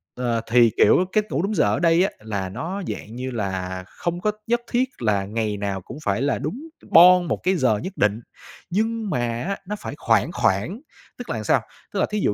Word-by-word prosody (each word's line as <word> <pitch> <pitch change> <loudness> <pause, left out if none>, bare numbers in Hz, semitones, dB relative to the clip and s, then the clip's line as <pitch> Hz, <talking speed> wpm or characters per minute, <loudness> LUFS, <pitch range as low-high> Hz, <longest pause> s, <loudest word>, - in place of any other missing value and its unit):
Ờ, 120 -2 -1
thì, 120 -2 +6
kiểu, 180 - +5
cách 215 0 +2
ngủ - - 0
đúng 210 +2 -1
giờ - - +3
ở - - +1
đây 170 +1 +4
á, 195 - 0
là 100 -3 -4
nó 165 - -4
dạng 110 +2 -6
như 130 +1 -4
là 95 -4 -3
không 175 0 -4
có 210 +3 +1 0.2
nhất 240 +1 +1
thiết 255 +2 +2
là 105 -4 +1
ngày 105 0 -2
nào 100 -2 -3
cũng - - -10
phải 100 +3 0
là 140 0 0
đúng 215 - -4 0.3
boong 180 +1 +8
một - - 0
cái 185 +1 +2
giờ 125 - +2
nhất 185 - -6
định, 105 +1 +2 0.5
nhưng 220 +3 -1
mà 125 - 0 0.2
á, 195 +3 -2
nó 210 - -2
phải - - -6
khoảng - - +2
khoảng, 135 - 0 0.4
tức 245 - -8
là 110 -2 -3
sao? - - +3 0.3
Tức - - -1
là - - +3
thí 210 - 0
dụ 105 - +1
130 Hz, 225 wpm, -23 LUFS, -, 0.5 s, boong